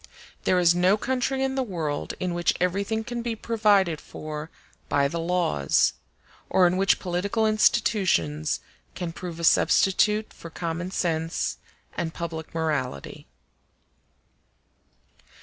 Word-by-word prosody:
There 185 - +3
is 175 -1 +5
no 180 +3 +3
country 260 +2 -1
in 265 0 0
the 265 - 0
world 165 - -3
in 180 -1 -2
which 175 0 +1
everything 200 +5 0
can 240 +1 -4
be 235 -1 -2
provided 205 -8 +2
for 155 0 -7 0.4
by 140 -1 +3
the 170 +4 -4
laws, 165 - +2 0.6
or 185 - +4
in 175 +1 +3
which 195 +1 +3
political 195 +5 -1
institutions 185 - +2 0.3
can 175 -3 -4
prove 170 -1 -7
a - - -5
substitute 210 +5 +3
for 165 - -10
common 170 +2 -4
sense 165 -3 -1 0.4
and 165 -1 -3
public 165 -1 -6
morality. 145 - -3
180 Hz, 125 wpm, -25 LUFS, 160-210 Hz, 0.6 s, is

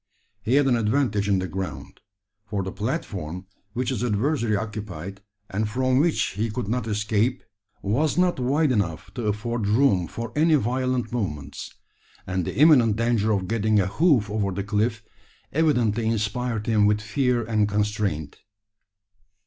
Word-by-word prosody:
He 110 +5 +1
had 145 0 +4
an 130 -2 +3
advantage 110 -3 +1
in 100 - +3
the 95 0 -2
ground: 95 0 -6 0.5
for 100 -3 -2
the 95 - -4
platform 95 - -4 0.3
which 125 +2 -1
his 125 -3 -2
adversary 115 0 +1
occupied, 100 -4 -6 0.3
and 105 +2 -2
from 130 +3 +1
which 165 +2 +1
he 110 +4 -2
could 110 0 -4
not 120 +2 -1
escape, 110 +4 0 0.4
was 135 - +1
not 180 -4 +2
wide 140 +4 +2
enough 95 -9 -2
to 120 -4 -3
afford 110 +1 -2
room 105 -6 +3
for 115 +6 -6
any 160 +1 +4
violent 125 -1 0
movements; 75 - -4 0.5
and 95 -2 -2
the - - -4
imminent 130 -8 +6
danger 115 -1 +1
of 95 -3 0
getting 110 0 +2
a 95 - +2
hoof 125 - +3
over 105 -1 -1
the 100 +2 -3
cliff, 105 +2 -1 0.5
evidently 120 -8 +2
inspired 110 +1 -1
him 105 -2 +3
with 105 0 +2
fear 120 +2 0
and 110 -2 +1
constraint. 100 -7 -1
110 Hz, 155 wpm, -24 LUFS, 100-125 Hz, 0.5 s, imminent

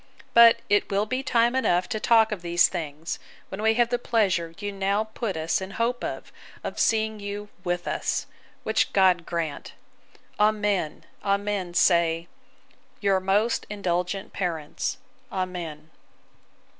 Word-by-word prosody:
But 235 0 +8
it 205 0 +2
will 200 +1 +1
be 255 +4 -2
time 240 -2 +2
enough 180 -9 +2
to 215 - -2
talk 225 0 +4
of 205 -4 -3
these 175 0 +4
things, 160 -2 -5 0.3
when 195 - -6
we 220 0 +3
have 240 0 +3
the 245 0 0
pleasure 185 -9 0
you 205 0 -4
now 200 +2 0
put 220 -3 -4
us 160 +3 0
in 190 - -5
hope 240 +1 0
of, - - -5 0.3
of - - -5
seeing 220 -1 +1
you 205 0 -6
with 175 0 -2
us; - - -1 0.4
which 220 - +1
God 185 -3 +4
grant. 165 -4 -4 0.7
Amen, 210 -6 +1 0.2
amen, 200 -3 -1
say 170 -2 +3 0.7
'Your 195 -2 +2
most 200 +5 +1
indulgent 185 -1 -2
parents. 175 - -3 0.3
Amen! 170 -5 -5
195 Hz, 140 wpm, -25 LUFS, 175-220 Hz, 0.7 s, But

